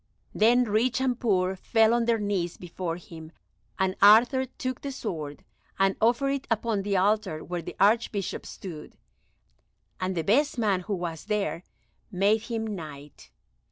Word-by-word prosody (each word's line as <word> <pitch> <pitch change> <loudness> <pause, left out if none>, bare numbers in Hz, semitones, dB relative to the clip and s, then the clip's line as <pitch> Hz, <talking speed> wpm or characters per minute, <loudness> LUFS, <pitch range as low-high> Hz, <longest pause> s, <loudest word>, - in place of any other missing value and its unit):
Then 240 +3 +4
rich 230 +2 +1
and 255 -2 0
poor 190 -4 +1
fell 225 +3 +3
on 235 -1 +2
their 230 -1 +2
knees 200 -5 -2
before 175 -1 -5
him, 165 -2 -11 0.5
and 190 -1 0
Arthur 235 +6 +6
took 255 0 -5
the 280 - -4
sword 160 - -6 0.3
and 195 0 +2
offered 240 +5 +3
it 275 -1 -3
upon 225 -2 0
the 200 0 0
altar 195 -4 +1
where 175 -1 -4
the - - -8
Archbishop 205 -2 +1
stood, 165 -6 -9 1.0
and 185 0 -2
the 165 - 0
best 265 - +2
man 205 -5 +1
who 200 +3 -3
was 170 -3 -5
there 210 -5 -1 0.5
made 200 +4 +2
him 225 -1 -3
Knight. 155 -8 -8
205 Hz, 155 wpm, -27 LUFS, 180-230 Hz, 1.0 s, Arthur